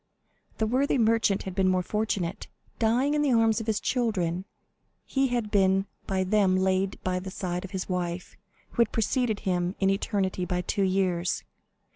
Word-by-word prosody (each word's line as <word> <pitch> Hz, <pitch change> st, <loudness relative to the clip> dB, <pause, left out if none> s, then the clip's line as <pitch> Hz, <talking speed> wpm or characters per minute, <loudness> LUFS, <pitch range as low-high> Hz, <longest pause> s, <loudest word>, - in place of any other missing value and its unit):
The 220 Hz, -, +1 dB
worthy 260 Hz, +5 st, +1 dB
merchant 225 Hz, -4 st, +2 dB
had 190 Hz, -, -5 dB
been 190 Hz, 0 st, +2 dB
more 185 Hz, -1 st, +2 dB
fortunate. 200 Hz, -2 st, -2 dB, 0.3 s
Dying 245 Hz, +5 st, +2 dB
in 300 Hz, -, +2 dB
the 285 Hz, -4 st, +2 dB
arms 225 Hz, -1 st, +3 dB
of 220 Hz, -, -7 dB
his 215 Hz, -2 st, +1 dB
children, 190 Hz, -8 st, -1 dB, 0.6 s
he 270 Hz, 0 st, +1 dB
had 240 Hz, -4 st, -2 dB
been 195 Hz, -1 st, +3 dB, 0.2 s
by 190 Hz, -1 st, 0 dB
them 190 Hz, -1 st, +3 dB
laid 190 Hz, +1 st, +1 dB
by 180 Hz, 0 st, 0 dB
the 190 Hz, +1 st, -6 dB
side 180 Hz, -1 st, -3 dB
of 195 Hz, -, -7 dB
his 190 Hz, -1 st, -4 dB
wife, 180 Hz, -1 st, -3 dB, 0.4 s
who 235 Hz, -, +1 dB
had 230 Hz, -, +2 dB
preceded 225 Hz, -1 st, 0 dB
him 180 Hz, 0 st, -1 dB
in 195 Hz, 0 st, +3 dB
eternity 195 Hz, -2 st, -1 dB
by 180 Hz, 0 st, -1 dB
two 200 Hz, -, -2 dB
years. 185 Hz, -2 st, +1 dB
195 Hz, 175 wpm, -27 LUFS, 185-225 Hz, 0.6 s, arms